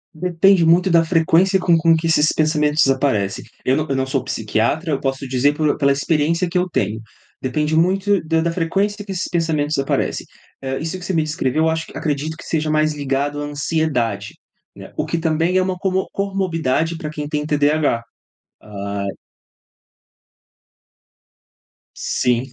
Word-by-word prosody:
Depende 180 +2 +3
muito 180 +3 +4
da 165 -1 +5
frequência 170 +3 +3
com 175 -2 +3
com 165 0 +4
que 160 +1 -2
esses 155 -2 +3
pensamentos 150 -2 +2
aparecem. 130 -8 0 0.2
Eu 130 - +3
não 155 +1 -1
eu 135 - 0
não 130 0 0
sou 135 -1 -1
psiquiatra, 115 - -1
eu 140 - 0
posso 135 0 -3
dizer 130 +3 +2
pelo 155 -2 +2
pela 140 -1 +3
experiência 160 +5 +1
que 170 - -10
eu 180 +1 0
tenho, 110 - -1 0.4
depende 150 +4 -1
muito 190 +4 +2
da 160 0 +1
da 170 +1 0
frequência 195 +5 -1
que 200 - -8
esses 185 -2 -2
pensamentos 155 -4 0
aparecem. 135 - -1 0.4
Hã, 135 0 -2
isso 165 +5 -4
que 180 - -9
você 190 - -2
me 160 -2 +2
descreveu 155 -1 -1
eu 160 - +3
acho 160 0 -2
acredito 155 +1 -2
que - - -11
seja 155 -1 -1
mais 155 0 +2
ligado 145 +1 -2
à - - -3
ansiedade, 145 -4 -1 0.4
né, - - -12
o - - -1
que - - -2
também 165 +2 +1
é 185 - +3
uma 185 0 -2
como 190 0 0
comorbidade 170 -6 -1
para 155 -2 -5
quem 150 -1 -5
tem 150 0 -2
TDAH, 150 -4 +1 0.6
ai. 100 -1 -5 2.9
Sim, 125 +1 0
155 Hz, 170 wpm, -20 LUFS, 140-170 Hz, 2.9 s, da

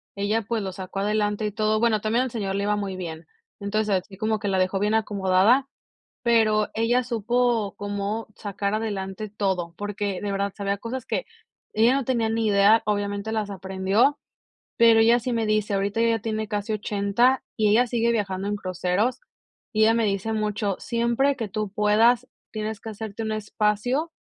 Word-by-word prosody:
ella, 205 +3 0
pues, 225 0 -2
los 190 -1 -5
sacó 190 +1 -5
adelante 210 +1 0
y 210 - -1
todo, 215 0 +1
bueno, 220 -2 +2
también 225 +4 +1
al 255 - -5
señor 200 -4 -3
le 200 - -1
iba 210 +1 +1
muy 200 -2 -3
bien. 165 -3 -6 0.4
Entonces, 200 -1 0
así 195 - -14
como 215 +1 0
que 205 - -3
la 190 - +1
dejó 185 +1 +1
bien 210 +2 +1
acomodada, 205 +4 +3 0.6
pero 220 -3 +3
ella 240 +3 +2
supo 235 -2 0
cómo 205 +2 -3
sacar 200 0 -3
adelante 205 -1 -3
todo, 190 -5 -2
porque 205 -1 -3
de 205 - -2
verdad 200 0 -1
sabía 200 -1 -2
cosas 235 +3 -5
que - - -2 0.5
ella 230 +4 +4
no 275 -1 0
tenía 235 -3 0
ni 225 0 0
idea, 205 +2 +5
obviamente 205 0 -1
las 215 -2 -2
aprendió, 195 +8 +1 0.6
pero 230 -1 +6
ella 230 +2 +5
sí 250 +2 -3
me 230 -2 0
dice. 215 -1 +1
Ahorita 200 +3 0
ella 230 0 +3
tiene 220 -1 -3
casi 210 +1 -2
80, 210 +5 +1
y 215 -2 +2
ella 240 +4 +4
sigue 235 0 +1
viajando 195 -2 -2
en 205 - -1
cruceros, 185 +4 -1 0.5
y 215 - +2
ella 225 +1 +5
me 230 -1 +2
dice 200 +2 -1
mucho: 210 -2 -1
"Siempre 235 +4 +1
que 225 -4 -4
tú 210 +1 -3
puedas 225 +4 +3 0.2
tienes 215 0 -4
que 225 - -7
hacerte 220 0 -6
un 220 - -2
espacio 215 +8 0
215 Hz, 185 wpm, -24 LUFS, 200-225 Hz, 0.6 s, pero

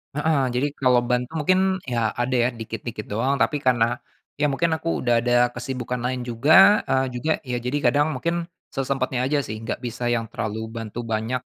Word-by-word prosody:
Heeh. 150 -1 +2
Jadi, 140 +4 +1
kalau 125 -2 +4
bantu 125 +2 -1
mungkin 185 +5 +3 0.2
ya 120 -3 -2 0.2
ada 130 +1 0
ya 125 - +2
dikit-dikit 115 0 -6
doang. 125 +7 +1
Tapi, 150 - +2
karena 120 -1 +2 0.4
ya 150 - +3
mungkin 165 +4 0
aku 165 - -4
udah 120 -1 +3
ada 120 +1 0 0.2
kesibukan 125 0 -4
lain 125 0 -1
juga, 155 - +5
eee, 130 0 +2
juga 155 +6 -1
Ya, 125 -2 -3
jadi, 125 +4 -2
kadang 145 +2 +2
mungkin 170 +4 -2 0.2
sesempatnya 135 -1 -1
aja 145 +2 +1
sih, 110 -1 -5
nggak - - -3
bisa 120 0 -5
yang 115 - -2
terlalu 110 0 -3 0.2
bantu 115 0 -6
banyak 115 +4 -1
125 Hz, 180 wpm, -23 LUFS, 120-140 Hz, 0.4 s, juga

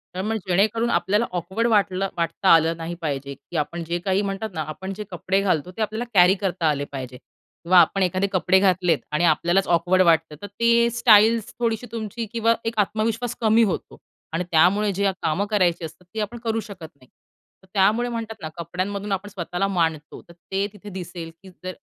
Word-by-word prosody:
तर 185 - -2
मग 220 +2 -2
जेणेकरून 215 +6 +2
आपल्याला 210 +2 +1
ऑकवर्ड 190 +6 -1
वाटलं 195 -3 +1
वाटता 170 +3 -1
आलं 165 0 +3
नाही 170 +1 -5
पाहिजे, 140 -3 -3
की 170 - -8
आपण 165 +3 -2
जे 170 +1 -3
काही 195 +1 +2
म्हणतात 200 +2 -3
ना 160 - -3
आपण 190 +5 -6
जे 210 +2 -6
कपडे 185 +3 0
घालतो 180 -3 0
ते - - -3
आपल्याला 220 +2 -2
कॅरी 180 -1 +6
करता 185 -5 -1
आले 145 -1 -1
पाहिजे 130 -2 -7
किंवा 170 +6 -3
आपण 190 +3 +3
एखादे 185 +2 0
कपडे 185 +1 +3
घातलेत 180 -4 +2
आणि 150 +3 0
आपल्यालाच 175 +4 +2
ऑकवर्ड 175 +2 +3
वाटतं 160 -3 +2
तर 205 - -6
ते 235 0 +4
स्टाइल्स 225 -1 +4
थोडीशी 230 0 -1
तुमची 225 0 -4
किंवा 230 0 +3
एक 225 -1 -2
आत्मविश्वास 220 +3 -1
कमी 225 +1 +4
होतो 200 -5 -3 0.4
आणि 170 - 0
त्यामुळे 195 +6 +4
जे 195 +1 +1
कामं 185 +6 0
करायची 180 -5 +1
असतात 160 +3 -12
ती 220 - -4
आपण 215 +3 -3
करू 225 -1 0
शकत 190 -7 -9
नाही. 130 -2 -22 0.6
तर - - -21
त्यामुळे 215 +5 +2
म्हणतात 225 -1 -5
ना 155 - -5
कपड्यांमधून 195 +4 -4
आपण 195 +2 -2
स्वतःला 180 0 -3
मांडतो, 165 -5 -2
तर 170 - -13
ते 190 +3 -3
तिथे 205 0 -11
दिसेल 180 -3 -7
की 190 - -12
जर 185 0 -8
190 Hz, 190 wpm, -23 LUFS, 170-215 Hz, 0.6 s, कॅरी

